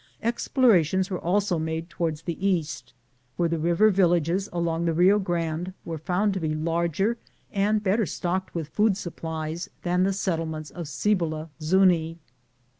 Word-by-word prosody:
Explorations 200 - +2
were 180 - -2
also 185 0 +1
made 160 +1 -3
toward 170 -3 -2
the 170 +1 -4
east, 150 -10 -1 0.4
where 175 - +2
the 165 -1 -1
river 175 +7 +4
villages 175 0 +2
along 170 -1 -1
the 165 -1 +1
Bio 190 +5 +5
Grande 175 -1 -2
were 165 -2 -4
found 185 +6 0
to 190 - -2
be 155 -2 -1
larger 170 +7 0 0.4
and 210 +1 +1
better 205 +1 +2
stocked 185 +3 -3
with 165 -3 -2
food 205 +2 +2
supplies 160 -2 -5
than 180 0 +1
the 190 +1 +3
settlements 165 -5 -2
at 170 -3 -5
Cibola 155 0 -1
Zufii. 165 -1 +3
175 Hz, 150 wpm, -26 LUFS, 160-190 Hz, 0.4 s, Bio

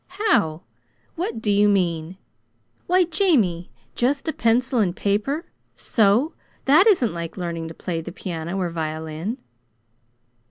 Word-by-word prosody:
"How? 170 - +2 0.5
What 335 - -4
do 210 - +1
you 205 +1 +4
mean? 175 -3 0 0.7
Why, 365 +1 +4
Jamie, 290 - +1 0.2
just 275 +5 0
a 315 - 0
pencil 245 +2 +1
and 185 -5 +1
paper, 225 - -1 0.3
so 225 +8 +2 0.3
that 310 +10 +6
isn't 305 - +3
like 170 +1 -6
learning 170 -2 -4
to 165 - -9
play 165 -2 -3
the 175 - -8
piano 170 0 -5
or 180 -3 -1
violin!" 160 +6 -4
200 Hz, 130 wpm, -23 LUFS, 170-265 Hz, 0.7 s, that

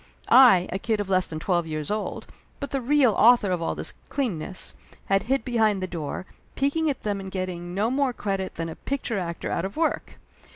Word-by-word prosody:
I, 230 -9 +8
a 190 - -2
kid 220 0 0
of 200 -1 -3
less 185 -1 +3
than 160 - -5
twelve 175 +1 0
years 155 0 -3
old, 210 0 -3 0.3
but 280 - -5
the 275 - -1
real 265 -1 +4
author 225 -3 +5
of 180 -2 -1
all 165 - -1
this - - -4 0.2
cleanness, 195 - -3 0.3
had 195 0 +2
hid 270 -4 +1
behind 220 -5 +2
the 185 - -2
door, 170 -1 -5 0.3
peeking 300 +3 +1
at 275 - -3
them 205 -2 -1
and 190 0 -6
getting 180 -2 -4
no 215 +4 +1
more 270 -1 +1
credit 195 -5 -3
than 165 0 -3
a 160 - -6
picture 255 -6 -3
actor 170 -2 -4
out 170 - -1
of 195 +6 -5
work 320 -1 -1
195 Hz, 210 wpm, -25 LUFS, 180-250 Hz, 0.3 s, I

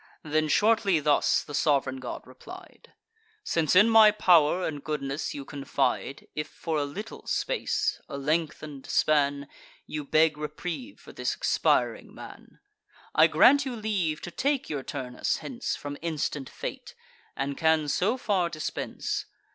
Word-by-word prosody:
Then 155 0 0
shortly 205 -1 +3
thus 150 -1 +2
the 145 - -10
sov'reign 140 -3 +1
god 130 - -6
replied: 365 - -13 0.5
"Since 165 -1 +1
in 205 +4 +7
my 225 -1 +8
pow'r 180 -4 +4
and 145 -3 -5
goodness 145 -1 -3
you 140 -1 -6
confide, 135 -1 -2
If 150 - -3
for 160 -2 -4
a 145 - 0
little 200 +10 -8
space, 435 -3 -1
a - - -5
lengthen'd 150 -1 -2
span, 140 -2 +2 0.4
You 150 -1 -5
beg 155 +1 +2
reprieve 175 - -6
for - - -14
this - - -2
expiring - - 0
man, - - -12 0.5
I - - +6
grant 285 0 +5
you 260 -3 -4
leave 200 -8 -1
to 175 - -7
take 275 - -1
your 145 -2 -2
Turnus 125 -1 -3
hence 250 -1 -4
From 145 0 -6
instant 150 -4 -3
fate, - - -7 0.4
and 140 0 -2
can 160 -1 +2
so 200 - +1
far 195 -8 0
dispense. 155 -2 -4
155 Hz, 145 wpm, -27 LUFS, 145-205 Hz, 0.5 s, my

